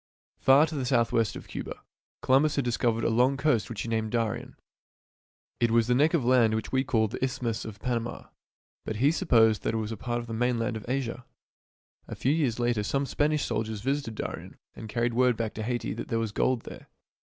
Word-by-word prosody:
Far 135 +3 +6
to 160 - -7
the 140 -3 -2
southwest 115 -3 +2
of - - -9
Cuba, - - -6 0.4
Columbus 140 +4 +3
had 140 - 0
dis 120 -1 0
covered 115 -2 0
a - - +2
long 125 +4 +3
coast 130 -6 +1
which 115 - -4
he - - -6
named 110 -1 -1
Darien. 120 +2 -2 1.0
It 120 - +3
was 115 0 +3
the 125 - +2
neck 150 +7 +3
of 140 -8 0
land 120 -3 +4
which 110 -1 -4
we 130 0 +2
call 115 -6 +1
the 110 - -5
Isthmus 120 -4 -2
of 110 -1 -8
Panama, 120 -1 -3 0.5
but 110 - -4
he 135 +7 +3
supposed 115 - +3
that 115 - -1
it - - +1
was 110 0 -3
a 110 - -5
part 120 +4 -3
of 120 - -6
the 115 - -6
mainland 120 0 0
of 110 +2 -7
Asia. 130 -2 -2 0.8
A - - -6
few 135 - 0
years 140 -8 0
later 120 -3 +1
some 140 +7 -1
Spanish 150 +2 0
sailors 110 -1 -3
visited 135 -2 -2
Darien - - -6 0.2
and 110 - -9
carried 120 +2 0
word 125 -1 +3
back 115 -2 -2
to 110 - -6
Haiti 120 -2 -2
that 110 - -6
there 115 - -1
was 115 -2 -1
gold 125 +3 +1
there. - - -11
120 Hz, 220 wpm, -28 LUFS, 110-130 Hz, 1.0 s, Far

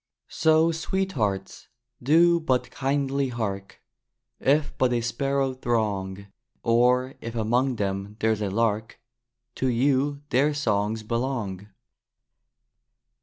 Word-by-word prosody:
So, 160 +1 +3
Sweethearts, 160 - -2 0.3
do 170 +6 +5
but 130 -6 0
kindly 140 0 0
hark! 100 -5 -5 0.6
If 145 +2 +1
but 130 -1 +3
a 120 - +1
sparrow 135 +3 -1
throng, 105 -6 -2 0.4
Or 125 +3 +3
if 115 +1 -6
among 120 +4 +1
them 100 0 -3
there's 110 -1 +1
a 100 - -1
lark, 110 +1 -1 0.6
To 130 - 0
you 140 +3 +1
their 145 +4 +3
songs 110 -4 0
belong! 115 -5 -3
120 Hz, 105 wpm, -25 LUFS, 105-140 Hz, 0.6 s, do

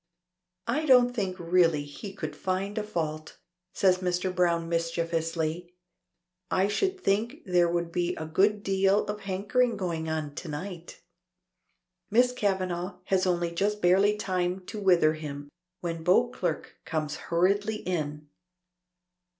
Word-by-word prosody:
"I 300 +7 -1
don't 250 -2 +6
think 190 -5 -1
really 165 -3 +3
he 170 +8 -8
could 155 -6 -6
find 190 +4 -2
a - - -2
fault," 155 -6 -4 0.3
says 185 -2 +3
Mr. 180 0 -1
Browne 170 -2 +1
mischievously. 165 0 -2 0.7
"I 190 +1 +2
should 380 - 0
think 230 - 0
there 175 -2 +3
will 170 0 0
be 175 +1 -1
a 160 - -5
good 200 +6 +2
deal 195 +1 +2
of 210 0 -4
hankering 210 +6 0
going 165 -4 -2
on 155 -2 -3
to 170 - -7
night." 175 +3 -7 1.1
Miss 245 +4 +4
Kavanagh 185 -5 -1
has 185 0 +1
only 175 -1 0
just 205 +4 0
barely 195 +3 +4
time 185 -2 -1
to 215 - -6
wither 175 -6 +4
him, 145 -2 -7 0.3
when 165 -2 -4
Beauclerk 235 +8 +1
comes 155 -2 -3
hurriedly 200 +5 +1
in. 150 -7 -3
180 Hz, 135 wpm, -28 LUFS, 165-200 Hz, 1.1 s, don't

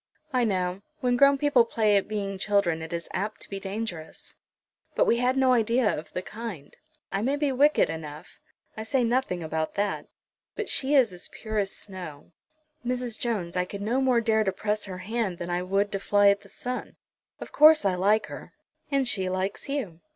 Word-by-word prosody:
"I 250 -2 +3
know. 185 -2 -1 0.2
When 250 -1 +2
grown 275 +2 +6
people 280 -4 +4
play 220 -2 +2
at 200 - +2
being 200 -2 -3
children, 190 -5 +1
it 160 - -7
is 170 -1 -4
apt 210 +3 -3
to - - -6
be 195 - -3
dangerous." 195 -5 -6 0.6
"But - - +4
we 235 - +3
had 250 +2 +1
no 260 -1 +4
idea 230 0 +2
of 155 - -8
the 180 - -3
kind. 210 -11 -8 0.4
I 195 - -1
may 265 +6 +1
be 290 -1 0
wicked 285 +4 +4
enough. 155 0 -8 0.4
I 220 - -5
say 245 +4 +1
nothing 235 -7 0
about 160 0 -2
that. 205 0 -1 0.5
But 435 - -3
she 280 +2 +2
is 245 -8 +4
as 180 - -8
pure 215 -1 -3
as 195 -1 0
snow. 175 -7 -8 0.5
Mrs. 245 -2 -2
Jones, 205 -8 -2
I 180 - +2
could 200 +2 -7
no 240 +6 +1
more 255 -3 +3
dare 220 -1 +2
to 195 - 0
press 210 +2 -2
her 185 -2 -6
hand 220 -4 -1
than 175 0 -5
I 175 +1 0
would 195 +3 0
to 195 - -2
fly 205 0 +4
at 200 0 -1
the - - -17
sun. 250 0 -5 0.4
Of - - -8
course 305 -4 +7
I 195 - +3
like 200 +4 +2
her." - - -10 0.4
"And 275 -2 +1
she 190 -5 0
likes 190 +7 -3
you." 245 - -3
210 Hz, 200 wpm, -27 LUFS, 185-245 Hz, 0.6 s, course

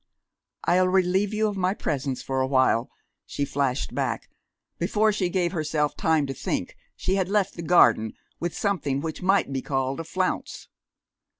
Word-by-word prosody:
"I'll 185 +1 +3
relieve 190 +2 +2
you 215 0 +1
of 205 - -3
my 185 +1 0
presence 135 -6 -2
for 135 0 -1
awhile," 130 -2 +2 0.4
she 145 - -2
flashed 135 -1 -1
back. - - -2 0.5
Before 210 +5 +2
she 190 -4 0
gave 175 -2 0
herself 155 -3 -1
time 160 -3 +2
to 135 - -4
think, - - -3 0.2
she 190 +1 -1
had 190 -1 0
left 200 -1 +1
the 170 - -7
garden, 160 -10 +4 0.3
with 175 -1 -3
something 155 -9 0
which 160 0 -5
might 185 -6 +2
be 135 - -1
called 135 0 -1
a - - -3
flounce. 185 +3 -3
170 Hz, 165 wpm, -25 LUFS, 140-190 Hz, 0.5 s, garden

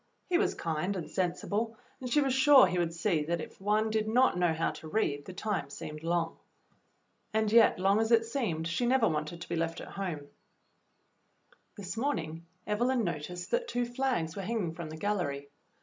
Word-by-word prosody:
He 350 - +4
was 405 - +1
kind 165 +4 -2
and 175 -4 -4
sensible, 205 +5 -2 0.2
and 255 - -5
she 295 - +4
was 270 -2 +1
sure 265 -1 +7
he 180 -1 -1
would 170 -1 0
see 170 -3 +1
that 170 +2 -1
if 155 - -9
one 215 +2 +1
did 215 0 0
not 250 +1 +4
know 175 -1 +2
how 160 +1 0
to 160 - -10
read, 150 -7 -1
the - - -7
time 195 -8 -2
seemed 150 +2 -7
long. 165 0 -1 1.0
And 220 -1 +2
yet 230 0 +6
long 195 +3 +3
as 225 +1 0
it 230 -1 +5
seemed 220 - -2
she 170 +9 0
never 255 -2 +4
w^anted 155 +1 -2
to - - -7
be 170 - -2
left 165 0 -1
at - - -8
home. 160 -7 -5 1.5
This 195 -1 -5
morning 165 - -2 0.2
Evelyn 240 +4 +1
noticed 175 +1 -4
that 485 0 +1
two 245 - -1
flags 240 -10 -1
were 200 - -4
hanging 195 -5 -2
from 165 -1 -7
the 155 - -7
gallery. 155 -8 -2
190 Hz, 195 wpm, -30 LUFS, 165-225 Hz, 1.5 s, sure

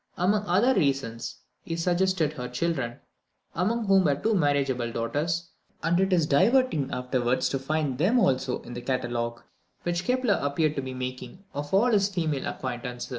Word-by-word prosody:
Among 205 +4 +2
other 205 +9 +4
reasons, 135 - -1 0.3
he 165 - -4
suggested 175 -2 +1
her 125 -4 -5
children, 125 -2 -2 0.6
among 220 +6 0
whom 195 -2 +4
were 145 -2 +3
two 220 +10 0
marriageable 140 - +1
daughters; 155 +9 -2 0.3
and 170 +2 +2
it 190 0 +2
is 170 -4 +3
diverting 185 - +3
afterwards 125 0 0
to 135 - -1
find 145 -1 -1
them 200 +10 +3
also 130 - +1
in 120 - -9
the 120 - -5
catalogue, 120 -2 -2 0.4
which 175 0 -1
Kepler 250 -2 +1
appeared 150 +2 +1
to - - 0
be 130 -1 -6
making, 130 +6 -6
of 145 +1 -5
all 225 +6 +4
his 200 -2 +3
female 160 -8 -1
acquaintance.... 125 -1 -5
150 Hz, 165 wpm, -27 LUFS, 130-185 Hz, 0.6 s, other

